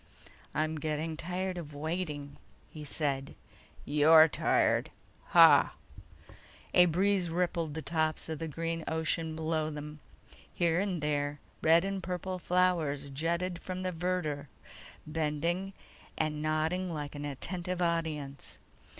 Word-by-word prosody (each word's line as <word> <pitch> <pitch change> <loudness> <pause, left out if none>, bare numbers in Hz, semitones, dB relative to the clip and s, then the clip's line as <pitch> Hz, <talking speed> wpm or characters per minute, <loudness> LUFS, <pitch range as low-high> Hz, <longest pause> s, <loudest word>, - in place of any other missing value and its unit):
"I'm 155 +1 0
getting 155 +1 -2
tired 180 +3 -3
of 150 -3 -9
waiting," 150 -2 -4 0.3
he 155 - -8
said. 140 -2 -2 0.5
"You're 155 +2 +7
tired! 150 - +2 0.4
Hah!" - - +7 1.0
A 180 0 +7
breeze 185 +1 +2
rippled 170 -2 -1
the 160 - -4
tops 155 +1 -1
of 160 -2 -4
the 165 - -3
green 165 +2 -3
ocean 160 0 -1
below 160 -1 -1
them. 150 0 -7 0.5
Here 170 -1 +1
and 185 -5 -1
there, 145 -1 -1 0.2
red 165 +3 +5
and 195 -1 -2
purple 185 +1 -4
flowers 165 -6 +1
jutted 170 +5 -1
from 185 0 -5
the 185 - -1
verdure, 165 -4 -2 0.6
bending 160 +5 -1 0.5
and 150 -1 -1
nodding 160 +4 0
like 150 -3 -4
an 145 -1 -6
attentive 175 +6 -4
audience. 160 -5 -2
160 Hz, 125 wpm, -31 LUFS, 150-180 Hz, 1.0 s, You're